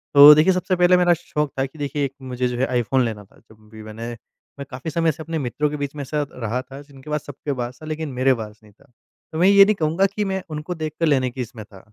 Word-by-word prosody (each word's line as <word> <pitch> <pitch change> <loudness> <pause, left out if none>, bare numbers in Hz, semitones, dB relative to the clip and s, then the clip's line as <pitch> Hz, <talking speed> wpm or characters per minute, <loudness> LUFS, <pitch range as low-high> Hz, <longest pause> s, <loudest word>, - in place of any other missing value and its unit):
तो 145 +1 +11
देखिए 160 +5 +4
सबसे 185 +1 0
पहले 180 0 +5
मेरा 175 -1 +4
शौक 150 -3 -3
था 135 - +2
कि 135 +4 -12
देखिए 145 0 -1
एक 135 - -6
मुझे 125 -1 -2
जो 125 0 -4
है 130 - +2
आईफ़ोन 125 +1 +1
लेना 110 -3 -5
था। - - -25
जब 110 - -18 0.2
भी 110 0 -10
मैंने 110 +2 -7 0.5
मैं 140 - -5
काफ़ी 130 +5 -6
समय 165 +1 +2
से 160 +2 -9
अपने 165 0 -4
मित्रों 145 +3 -1
के 150 - -5
बीच 145 -1 -4
में 145 - -5
ऐसा 145 +2 -2
रहा 120 +1 -3
था 135 +2 -11
जिनके 140 0 -15
पास 150 -1 -2
सबके 145 +1 -5
पास 125 0 -5
था - - -9
लेकिन 155 0 -4
मेरे 130 +1 +3
पास 110 -3 -7
नहीं 105 -1 -19
था। - - -25 0.5
तो 160 - -5
मैं 180 - +5
ये 200 0 +8
नहीं 215 +1 +2
कहूँगा 165 +5 +2
कि 210 - 0
मैं 190 - -2
उनको 150 +4 -5
देख 155 -2 -4
कर 165 - +2
लेने 130 -4 +2
की 130 - -5
इसमें 120 -2 -7
था। 100 -3 -15
140 Hz, 275 wpm, -22 LUFS, 125-160 Hz, 0.5 s, तो